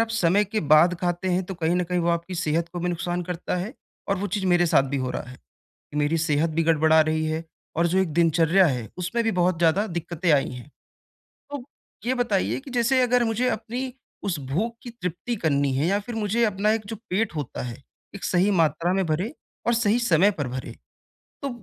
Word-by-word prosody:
आप 230 - +2
समय 205 -2 +3
के 215 +2 -2
बाद 155 +4 +5
खाते 175 +1 -1
हैं 180 +1 +1
तो 190 - -6
कहीं 170 -1 0
न 180 - +1
कहीं 180 +1 -1
वो 170 - 0
आपकी 170 +2 -2
सेहत 165 0 0
को 175 - -4
भी 175 - -1
नुकसान 175 +1 -2
करता 180 +1 -3
है 190 +6 -3 0.4
और 195 - +2
वो 200 - -2
चीज़ 195 +1 -2
मेरे 175 -1 +4
साथ 160 - +4
भी 140 - -1
हो 130 -1 -2
रहा - - -3
है। 125 - -12 0.6
मेरी 150 +2 +1
सेहत 155 0 +1
भी 165 +1 +1
गड़बड़ा 160 0 +4
रही 155 0 0
है 155 +1 -2 0.3
और 170 +1 +2
जो 180 +2 +1
एक 180 -5 0
दिनचर्या 170 +3 +4
है 125 -6 -2
उसमें 180 +7 -1
भी 225 - +2
बहुत 180 -2 +1
ज़्यादा 170 +5 +3
दिक्कतें 170 0 -1
आई 145 -2 +3
हैं। 125 +2 -9 0.8
तो 285 -3 -5 0.4
ये 250 - +2
बताइए 205 -5 0
कि 270 0 -11
जैसे 245 +2 +3
अगर 245 0 +3
मुझे 230 +3 +1
अपनी 245 +4 -3 0.3
उस 175 -6 -1
भूख 225 +10 -1
की 245 - -7
तृप्ति 230 +1 -4
करनी 140 -3 +2
है 145 +5 +1
या 200 +3 +2
फिर 240 - -4
मुझे 220 +2 +1
अपना 210 0 +1
एक 220 -2 -3
जो 225 - -4
पेट 200 0 0
होता 145 -4 -4
है, 120 -1 -6 0.4
एक 200 - -8
सही 185 +3 +2
मात्रा 165 +3 +1
में 190 0 +1
भरे 170 - -1 0.3
और 235 - +4
सही 230 0 +2
समय 200 -3 +4
पर 145 -9 -3
भरे, 130 +1 -5 0.7
तो 280 - -1
175 Hz, 220 wpm, -25 LUFS, 160-210 Hz, 0.8 s, बाद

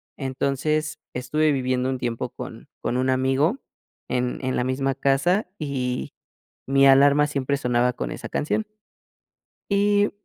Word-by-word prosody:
Entonces, 140 +3 -1 0.2
estuve 150 +5 +1
viviendo 130 -1 0
un 130 - -1
tiempo 120 -2 -3
con - - -9
con 125 - -1
un 130 +1 +1
amigo 135 - +2 0.5
en 125 -1 -1
en 130 0 -1
la - - +1
misma 135 +2 0
casa 140 +9 +1
y 130 -4 -3 0.5
mi 135 +1 +4
alarma 140 +2 +6
siempre 140 -1 -1
sonaba 125 -1 +1
con 65 - -4
esa - - -7
canción. 215 +8 -1 1.1
Y 205 +1 +3
135 Hz, 135 wpm, -24 LUFS, 125-150 Hz, 1.1 s, alarma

